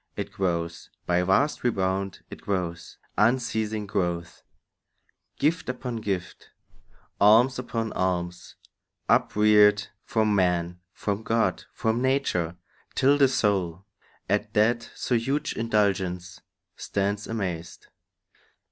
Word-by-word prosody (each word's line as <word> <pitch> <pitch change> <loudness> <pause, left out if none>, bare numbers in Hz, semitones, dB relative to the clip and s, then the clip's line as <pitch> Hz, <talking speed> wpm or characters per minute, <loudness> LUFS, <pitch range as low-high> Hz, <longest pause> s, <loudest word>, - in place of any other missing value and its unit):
It - - -4
grows— 85 -3 -2 0.2
By 90 0 +2
vast 95 +12 +2
rebound 95 -4 -1
it - - -9
grows, 90 -4 -3 0.2
unceasing 110 -2 +1
growth; 85 -4 -2 1.0
Gift 160 +1 0
upon 125 -2 -4
gift, 95 -4 -4 0.7
alms 115 +5 +5
upon 115 -3 -3
alms, 90 -1 -2 0.5
upreared, 105 -1 +4
From 110 -2 +1
man, 90 -2 +1
from 100 +2 -3
God, 115 +1 0
from 115 +2 -1
nature, 125 -11 0 0.4
till 140 +2 +4
the 140 - +7
soul 95 -7 0 0.4
At 105 +2 -1
that 115 +2 +2
so - - -2
huge 135 +6 0
indulgence 95 -5 -1 0.3
stands 100 +1 -2
amazed. 90 -7 -4
105 Hz, 105 wpm, -26 LUFS, 90-115 Hz, 1.0 s, the